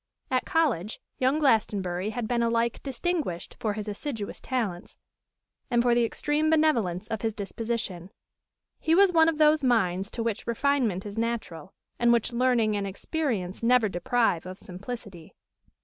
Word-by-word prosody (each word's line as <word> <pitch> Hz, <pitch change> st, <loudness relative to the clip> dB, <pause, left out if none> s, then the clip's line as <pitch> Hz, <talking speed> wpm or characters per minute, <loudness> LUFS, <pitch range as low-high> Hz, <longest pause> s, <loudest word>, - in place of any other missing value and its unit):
At 255 Hz, -1 st, +1 dB
college 240 Hz, -, 0 dB, 0.2 s
young 260 Hz, +3 st, +2 dB
Glastonbury 210 Hz, -, +1 dB
had 225 Hz, 0 st, -3 dB
been 240 Hz, 0 st, 0 dB
alike 230 Hz, 0 st, 0 dB
distinguished 275 Hz, -, -3 dB
for 215 Hz, -2 st, -1 dB
his 215 Hz, 0 st, -5 dB
assiduous 210 Hz, 0 st, -5 dB
talents 215 Hz, -9 st, -3 dB, 0.7 s
and 240 Hz, -1 st, +3 dB
for 240 Hz, -1 st, +4 dB
the 240 Hz, 0 st, +3 dB
extreme 295 Hz, +6 st, 0 dB
benevolence 240 Hz, -, +2 dB
of 220 Hz, -, -3 dB
his 225 Hz, -2 st, -1 dB
disposition. 205 Hz, -4 st, -4 dB, 0.7 s
His 320 Hz, +1 st, +2 dB
was 395 Hz, -1 st, +6 dB
one 325 Hz, -1 st, +5 dB
of 320 Hz, -, -2 dB
those 305 Hz, -1 st, +4 dB
minds 195 Hz, -6 st, +2 dB
to 230 Hz, -, -4 dB
which 225 Hz, -2 st, -3 dB
refinement 235 Hz, -6 st, +1 dB
is 205 Hz, +2 st, -5 dB
natural, 220 Hz, -8 st, -4 dB, 0.2 s
and 240 Hz, 0 st, +4 dB
which 235 Hz, +1 st, +1 dB
learning 235 Hz, -3 st, +2 dB
and 200 Hz, -1 st, -2 dB
experience 200 Hz, -, -3 dB
never 235 Hz, -1 st, +4 dB
deprive 185 Hz, -1 st, 0 dB
of 185 Hz, 0 st, -7 dB
simplicity. 195 Hz, -2 st, -9 dB
230 Hz, 150 wpm, -27 LUFS, 200-255 Hz, 0.7 s, was